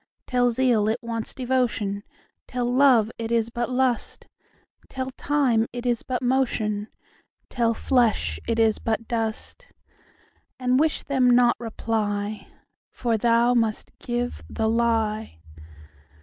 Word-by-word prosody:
Tell 245 -1 +2
zeal 235 -3 +2
it 220 - 0
wants 230 -1 -4
devotion; 245 -6 -1 0.5
Tell 250 -1 -2
love 245 -3 +4
it 225 0 -4
is 230 0 +1
but 240 +1 -2
lust; 255 -1 -1 0.6
Tell 260 0 -4
time 255 -5 +1
it 245 0 -6
is 240 -2 +1
but 255 -1 -3
motion; 225 -5 0 0.6
Tell 230 -2 +1
flesh 220 - +1
it 230 - 0
is 225 -1 +3
but 225 0 -2
dust:And 250 - -5
wish 315 0 +1
them 260 -3 +2
not 245 0 +5
reply, 215 -3 -3 0.4
For 235 -2 -1
thou 235 +2 +3
must 225 -3 0
give 245 0 -3
the 220 - -1
lie. 220 - 0
235 Hz, 120 wpm, -24 LUFS, 220-250 Hz, 0.6 s, not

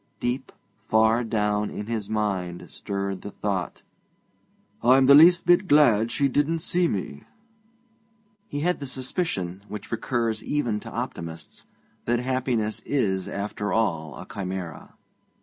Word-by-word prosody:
Deep, 125 +2 -2 0.3
far 110 +2 +3
down, 105 -2 0
in 105 - -6
his 110 -2 -3
mind 95 -5 -2
stirred 100 -1 -4
the - - -7
thought: 95 -4 -3 1.0
'I'm 130 +3 +5
just - - +2
the - - +10
least 175 +1 +5
bit 175 +2 +4
glad 120 - +5
she 140 +3 +1
didn't 145 +5 +1
see 175 +2 +1
me.' 90 - -4 1.2
He 145 - -4
had 180 +3 +1
the 140 - -5
suspicion, 125 - -3
which 105 +1 -8
recurs 115 -1 -1
even 120 -8 -1
to - - -9
optimists, 80 -1 -6 0.4
that 120 +1 +2
happiness 125 -4 -1
is 95 -10 0
after 105 0 -4
all 80 -10 -1
a - - -8
chimera. 95 -4 -6
110 Hz, 135 wpm, -25 LUFS, 100-130 Hz, 1.2 s, the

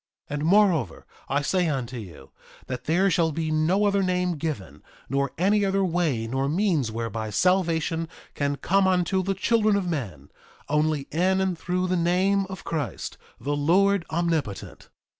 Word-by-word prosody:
3:17 - - -3
And 150 - -2
moreover, 175 - +3 0.2
I 145 +1 +1
say 180 +4 +1
unto 130 -4 -3
you, 85 - -10 0.3
that 125 -1 -6
there 185 +5 +2
shall 165 -2 +2
be 160 +1 -2
no 165 +7 +2
other 200 -1 +2
name 180 -1 0
given 100 - -5 0.3
nor 140 0 0
any 200 +4 +3
other 195 0 +1
way 165 -10 0
nor 135 +4 -1
means 165 - +1
whereby 115 -1 -4
salvation 165 - +1 0.2
can 145 0 -1
come 195 +6 +2
unto 185 0 +2
the 195 +1 -1
children 215 +1 +2
of 200 -2 0
men, 140 - -5 0.4
only 150 0 +1
in 185 +4 +2
and 190 -1 0
through 180 +2 -2
the 185 0 0
name 185 +3 +2
of 190 0 -8
Christ, 150 -7 -4 0.2
the 145 +1 -2
Lord 185 +6 +3
Omnipotent. 160 - -2
165 Hz, 160 wpm, -25 LUFS, 140-190 Hz, 0.4 s, moreover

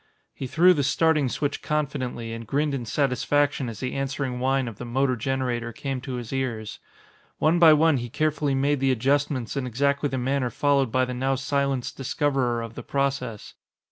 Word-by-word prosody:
He 135 - -5
threw 175 +7 +5
the 150 - 0
starting 150 0 +2
switch 145 +3 -2
confidently 130 -6 -2
and 115 -1 -7
grinned 145 +4 0
in 125 -4 -3
satisfaction 140 +1 +1
as 110 - -8
the 130 - -3
answering 135 -2 -2
whine 135 0 +1
of 110 -4 -8
the - - -5
motor 130 +2 +1
generator 125 -1 -2
came 135 +2 -4
to 130 -1 -5
his 120 0 -6
ears. 115 -5 -3 0.6
One 165 +3 +3
by 165 -2 +8
one 155 -1 +4
he 120 -1 -4
carefully 150 0 0
made 140 +1 +1
the 135 0 +2
adjustments 135 0 0
in 135 -2 -2
exactly 140 +4 0
the 135 - -2
manner 130 0 0
followed 140 0 +1
by 130 +1 +2
the 125 - -5
now 135 +2 0
silenced 135 -1 -1
discoverer 135 -3 0
of 115 -1 -8
the - - -7
process. 135 -6 -2
135 Hz, 185 wpm, -25 LUFS, 125-145 Hz, 0.6 s, by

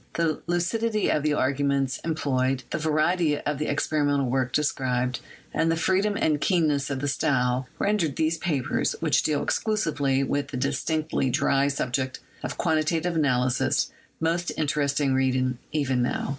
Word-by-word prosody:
The 165 -2 0
lucidity 210 +6 0
of 150 - +1
the 150 0 +1
arguments 140 -1 0
em 160 -1 -1
ployed, 130 -3 0
the - - -1
variety 155 +1 +2
of 145 -1 -3
the 150 - -1
experimental 145 -1 +1
work 130 0 0
described, 130 -4 0 0.3
and 165 0 +2
the - - +2
freedom 195 +5 +1
and 150 -2 +1
keenness 155 -7 +1
of 135 -2 -3
the 145 - -1
style, 125 -1 +1
render 205 -5 +1
these 160 +3 -1
papers, 145 -8 -1
which - - +2
deal 150 -2 0
exclusively 150 -11 0
with 145 +1 -1
the 130 - -5
distinctly 155 +1 -1
dry 135 +2 +2
subject 130 -2 -2 0.2
of - - -5
quantitative 160 +1 0
analysis, 125 -5 +1 0.3
most 170 +2 0
interesting 145 -2 +1
reading 130 -1 +1
even 135 -4 0
now. 120 - -1
145 Hz, 150 wpm, -26 LUFS, 130-160 Hz, 0.3 s, variety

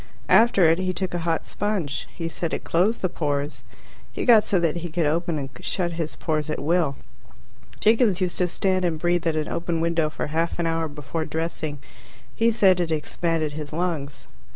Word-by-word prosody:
After 220 -6 +6
it 165 +2 +3
he 185 0 -1
took 185 0 -3
a 175 - -1
hot 165 - 0
sponge. 185 -9 -2
He 165 -2 -5
said 165 0 -2
it - - -6
closed 195 +7 +1
the - - +4
pores. 145 -3 -2 0.5
He - - -4
got 225 -4 +7
so 190 - +1
that 170 -1 +1
he 170 0 -5
could 165 0 0
open 165 +2 0
and 135 -2 -4
shut 175 -2 -1
his 165 -2 -4
pores 155 -2 -2
at 155 - -1
will. 160 -2 +1 0.8
Jiggins 220 -3 +3
used 180 -2 -1
to 180 - +3
stand 185 +1 0
and 170 -3 0
breathe 175 +1 +1
at 160 - +1
an 155 -1 -1
open 170 -1 -2
window 165 -1 +1
for - - -4
half 165 +1 0
an 170 - -1
hour 165 0 0
before 150 +2 -4
dressing. 160 -2 -3 0.6
He 230 +1 +3
said 190 -5 +4
it 175 -2 0
expanded 160 0 -1
his 150 0 -7
lungs. 160 -5 -3
165 Hz, 200 wpm, -24 LUFS, 155-180 Hz, 0.8 s, got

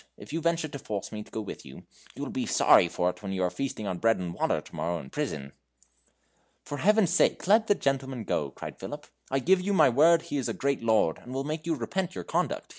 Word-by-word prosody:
If - - -11
you 165 - -1
venture 165 -1 +1
to 140 -2 -7
force 105 -5 -5
me 105 - -5
to - - -12
go 110 - -4
with 105 - -8
you, 65 - -12 0.3
you - - -5
will - - -4
be - - -2
sorry - - +5
for 90 +1 0
it - - -17
when 100 -2 -4
you 95 -1 -1
are 90 - +1
feasting 120 0 -4
on 95 -3 -3
bread 115 0 +3
and 90 -2 -4
water - - 0
tomorrow 85 +1 -4
in 65 - -11
prison." 70 -2 -3 1.1
"For 145 - -6
Heaven's 210 -2 +4
sake, 180 - +2
let 215 +4 +4
the 205 - +4
gentleman 135 - -1
go," 75 -7 -1
cried - - -9
Philip; - - -7 0.2
"I 135 - +1
give 180 +8 +3
you 200 +2 -1
my 190 - +6
word 160 +6 +5
he 145 - -3
is 135 - -1
a - - -3
great 140 0 0
lord, 110 -8 +2
and 125 +1 -9
will 135 - -1
make 155 +3 -4
you 165 - +1
repent 180 +9 -3
your - - -4
conduct. - - -2
135 Hz, 250 wpm, -28 LUFS, -, 1.1 s, my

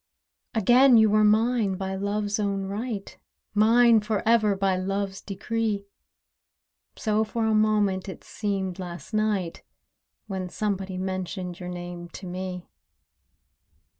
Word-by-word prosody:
Again 245 +4 +6
you 220 -1 +5
were 215 0 +4
mine 215 -1 +3
by 190 0 -4
Love's 205 +2 -1
own 200 -2 -1
right— 205 +1 -5 0.4
Mine 230 +2 +5
for 210 -1 -2
ever 215 -3 +4
by 195 -1 +1
Love's 195 +1 -2
decree: 210 +1 -2 1.1
So 215 -1 +1
for 220 +1 -2
a 220 - +2
moment 210 -3 +2
it 190 - -9
seemed 195 -3 -3
last 175 +3 -8
night, 210 -5 0 0.6
When 190 -3 -4
somebody 195 -2 -3
mentioned 185 -1 -4
your 180 -1 -6
name 175 -1 -7
to 195 - -8
me. 180 0 -5
200 Hz, 125 wpm, -26 LUFS, 190-215 Hz, 1.1 s, Again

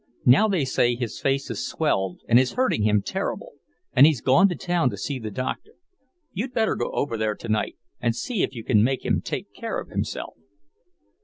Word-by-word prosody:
Now 135 - +6
they 185 -9 +1
say 120 -2 +2
his 120 -2 -4
face 135 0 0
has - - -3
swelled 95 - -1
and 120 +1 +6
is 130 0 +1
hurting 255 - +1
him 105 -1 +2
terrible, - - -4 0.4
and 135 +4 +8
he's 155 -6 +2
gone 155 - +4
to 175 - -2
town 175 -7 +1
to - - -6
see 140 -3 -3
the 110 -2 -5
doctor. 130 - -5 0.6
You'd 240 +7 -4
better 225 -2 +2
go - - -2
over 115 -5 -1
there 110 -1 -1
tonight, 110 -2 -2 0.2
and 120 -1 0
see 185 - -2
if 130 - -1
you 115 - -6
can 105 -1 +3
make 130 +2 0
him - - +1
take - - -5
care - - -4
of - - -9
himself." - - -4
130 Hz, 205 wpm, -24 LUFS, 115-170 Hz, 0.6 s, and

